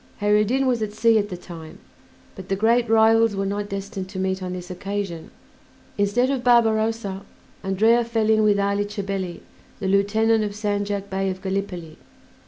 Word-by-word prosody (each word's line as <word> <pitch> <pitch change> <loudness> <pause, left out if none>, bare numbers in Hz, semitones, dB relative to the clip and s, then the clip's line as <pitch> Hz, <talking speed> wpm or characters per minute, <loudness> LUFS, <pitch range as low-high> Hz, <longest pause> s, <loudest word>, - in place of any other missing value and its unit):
Kheyr 205 0 +3
ed 210 0 +3
Din 265 +4 +1
was 245 -3 +1
at 210 -1 -3
sea 225 0 +3
at 205 0 -2
the 180 - -5
time, 165 -3 -11 0.6
but 190 -2 -10
the 195 - +1
great 230 +3 +2
rivals 225 -1 +4
were 195 0 -1
not 205 +1 -3
destined 195 -1 -5
to 190 - -8
meet 190 0 -1
on 180 -1 -4
this 180 0 -7
occasion. 195 -2 -5 0.7
Instead 215 +6 +1
of 265 -3 -2
Barbarossa, 225 -4 +2 0.4
Andrea 220 +5 +3
fell 225 -2 0
in 220 0 +4
with 205 -1 +3
Ali 200 +1 0
Chabelli, 195 -3 -4 0.4
the 195 - -3
lieutenant 215 +3 +2
of 205 -1 -4
Sandjak 205 -1 -2
Bey 195 0 -1
of 185 0 -4
Gallipoli. 190 -4 -4
205 Hz, 180 wpm, -23 LUFS, 195-220 Hz, 0.7 s, rivals